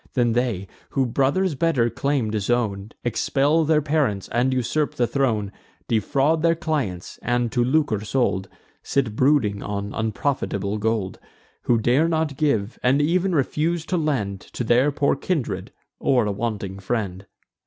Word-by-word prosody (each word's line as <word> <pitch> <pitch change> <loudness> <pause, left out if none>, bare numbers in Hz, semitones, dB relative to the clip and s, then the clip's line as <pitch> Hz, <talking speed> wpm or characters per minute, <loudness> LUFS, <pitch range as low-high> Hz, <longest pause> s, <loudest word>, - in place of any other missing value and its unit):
Then 120 -3 +2
they, 115 -6 -1 0.2
who 135 - +1
brothers' 140 +9 +1
better 135 -5 +2
claim 125 -2 0
disown, 105 -1 -1
Expel 140 +6 +2
their 155 -1 +3
parents, 140 -10 0
and 125 +3 +1
usurp 130 +4 0
the 120 - +2
throne; 115 -7 0 0.4
Defraud 140 +8 +1
their 165 0 +3
clients, 145 - -3
and, 120 -1 0
to 120 -1 +2
lucre 130 -4 +1
sold, 100 -5 0 0.3
Sit 125 -6 -1
brooding 125 -7 +2
on 100 0 -4
unprofitable 110 -3 -1
gold; 110 -3 -1 0.5
Who 120 - +4
dare 125 +8 +3
not 160 -3 0
give, 120 -8 0
and 130 +3 +3
ev'n 175 +4 +2
refuse 160 +4 0
to 180 - -1
lend 125 - -1
To - - -6
their 125 +5 +3
poor 140 0 +1
kindred, 150 -1 -2 0.3
or 125 -5 +2
a 105 - 0
wanting 100 -2 -3
friend. 100 -2 -3
125 Hz, 145 wpm, -23 LUFS, 105-145 Hz, 0.5 s, Who